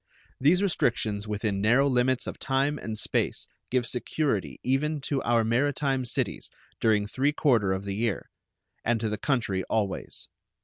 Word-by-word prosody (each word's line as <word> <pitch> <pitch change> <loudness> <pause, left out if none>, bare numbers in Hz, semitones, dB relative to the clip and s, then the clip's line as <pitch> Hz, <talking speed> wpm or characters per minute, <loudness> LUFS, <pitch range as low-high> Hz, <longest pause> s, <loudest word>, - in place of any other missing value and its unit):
These 170 +8 +4
restrictions 110 - 0
within 105 -1 -1
narrow 120 +7 +4
limits 130 -1 +2
of - - -6
time 140 +2 0
and 110 -1 -5
space - - 0 0.2
give 125 -1 +1
security 115 - -1
even 150 +4 +1
to 135 0 -1
our 115 -1 +2
maritime 135 +3 +1
cities 115 - -2 0.3
during 105 -2 +3
three 135 +7 0
quarter 120 -11 +3
of 95 +1 -1
the 100 - -2
year, 110 0 -2 0.5
and 115 0 +1
to 110 -1 -1
the 105 - -3
country 115 -9 0
always. 105 -4 -2
120 Hz, 150 wpm, -27 LUFS, 105-135 Hz, 0.5 s, These